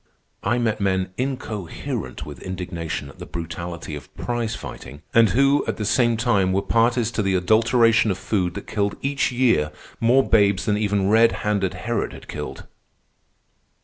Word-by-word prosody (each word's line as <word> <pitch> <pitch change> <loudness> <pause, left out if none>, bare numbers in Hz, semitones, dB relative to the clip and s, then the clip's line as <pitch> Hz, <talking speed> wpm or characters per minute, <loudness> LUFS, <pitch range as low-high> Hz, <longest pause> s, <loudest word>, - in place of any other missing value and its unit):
I 120 - +1
met 110 -3 0
men 95 -1 0
incoherent 110 -8 -4
with - - -9
indignation 85 -5 -4
at - - -16
the - - -8
brutality 85 -1 -6
of 75 - -8
prize 120 -2 -2
fighting, 70 +3 -9
and 115 -2 +6
who, 140 +3 +3
at - - -2
the 105 - -2
same 120 +1 +2
time, 100 -6 +2
were 100 +1 +1
parties 115 +2 +2
to 110 - -1
the 95 -2 +1
adulteration 115 +4 +4
of 95 - 0
food 90 -4 -1
that - - -6
killed 100 -1 -1
each 140 0 0
year 115 -12 +2 0.3
more 125 +3 +4
babes 100 -3 +3
than 105 -2 +2
even 100 -2 +1
red 115 +2 +5
handed 100 -3 0
Herod 110 +4 -2
had - - -12
killed. - - -6
105 Hz, 165 wpm, -23 LUFS, 95-120 Hz, 0.3 s, and